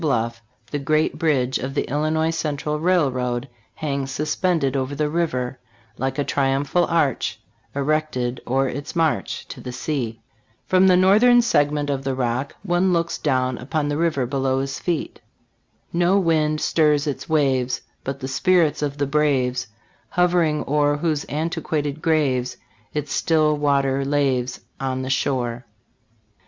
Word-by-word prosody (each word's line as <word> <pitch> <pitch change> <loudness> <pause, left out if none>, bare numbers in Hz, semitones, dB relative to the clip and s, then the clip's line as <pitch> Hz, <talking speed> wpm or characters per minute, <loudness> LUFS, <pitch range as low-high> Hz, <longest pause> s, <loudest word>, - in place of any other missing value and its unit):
bluff, 115 -6 0 0.3
the 145 - -1
great 155 +3 +1
bridge 135 -6 +1
of 135 +2 -5
the - - 0
Illinois 155 +3 0
Central 150 -2 -2
Railroad 130 -8 +1 0.3
hangs 140 -3 -2
suspended 150 0 0
over 135 +1 -1
the 150 +1 -1
river, 130 -7 -1 0.4
Like 135 +2 -2
a 145 - +1
triumphal 140 +5 +1
arch 160 -6 0 0.4
Erected 140 -4 -1
o'er 135 +2 +2
its 140 +6 -5
march 165 -2 0
To - - -8
the 125 - -6
sea. 125 -4 -3 0.5
From 185 0 +4
the 180 -1 +6
northern 220 +6 +6
segment 145 -10 +1
of 135 -1 -2
the 135 -1 -1
Rock, 130 +2 -2
one 185 0 +2
looks 170 -1 0
down 130 -3 0
upon 145 +3 -2
the 145 - -1
river 160 -6 +1
be 135 +3 -3
low 135 0 +1
his 135 0 -4
feet. 170 -3 -3 0.7
"No 175 +3 +3
wind 155 -4 +1
stirs 150 -2 +2
its 145 +1 -4
waves, 135 -5 +1 0.2
But 135 +1 -5
the 130 - -3
spirits 165 +3 +2
of 145 -1 -2
the 140 - +1
braves 130 -4 +1 0.5
Hov'ring 175 -4 +2
o'er, 145 0 +2
Whose 155 -1 -1
antiquated 150 -1 -2
graves 130 -6 +1 0.3
Its 150 -1 -3
still 155 -2 +2
water 140 -2 +1
laves 135 -3 0 0.2
On 130 -1 -2
the 130 - -3
shore." 125 -3 -1
145 Hz, 145 wpm, -22 LUFS, 130-155 Hz, 0.7 s, the